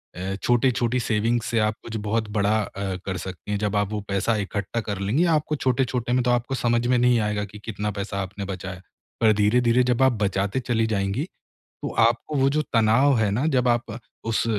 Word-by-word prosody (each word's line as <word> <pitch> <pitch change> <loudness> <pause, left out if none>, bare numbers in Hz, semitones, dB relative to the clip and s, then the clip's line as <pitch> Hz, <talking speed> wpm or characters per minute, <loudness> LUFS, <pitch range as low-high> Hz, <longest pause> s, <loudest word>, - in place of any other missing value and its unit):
अ, 95 +2 -3
छोटे-छोटे 120 0 +2
सेविंग्स 115 +1 0
से 115 - +2
आप 105 0 +1
कुछ 115 - -7
बहुत 110 0 0
बड़ा 105 +2 +2
अ, 100 -1 -4
कर 95 -2 -2
सकती 95 +3 -7
हैं, 105 - +1
जब 105 0 -1
आप 100 -1 +1
वो 105 -1 -2
पैसा 100 +3 +1
इकट्ठा 100 +2 -3
कर 100 -3 -4
लेंगी 115 - +1
आपको 150 0 -2
छोटे-छोटे 125 -3 0
में 125 - +3
तो 125 - +2
आपको 120 +2 0
समझ 120 -1 +1
में 125 - +3
नहीं 120 -1 +4
आएगा 105 -1 -1
कि 105 +1 -12
कितना 105 -1 -3
पैसा 100 0 -3
आपने 100 +1 -5
बचाया, 95 -1 -6 0.4
पर 110 -1 +5
धीरे-धीरे 120 +4 +3
जब 125 0 +1
आप 130 - +5
बचाते 100 +4 0
चली 115 -3 0
जाएँगी 100 +6 -1 0.6
तो - - -2 0.2
आपको 120 +6 -4
वो 135 +1 +3
जो 155 - +3
तनाव 120 +4 +4
है 105 -2 +2
ना, 120 +8 0
जब 130 -5 +2
आप 120 -1 0 0.3
उस 110 - +1
110 Hz, 205 wpm, -24 LUFS, 100-125 Hz, 0.6 s, पर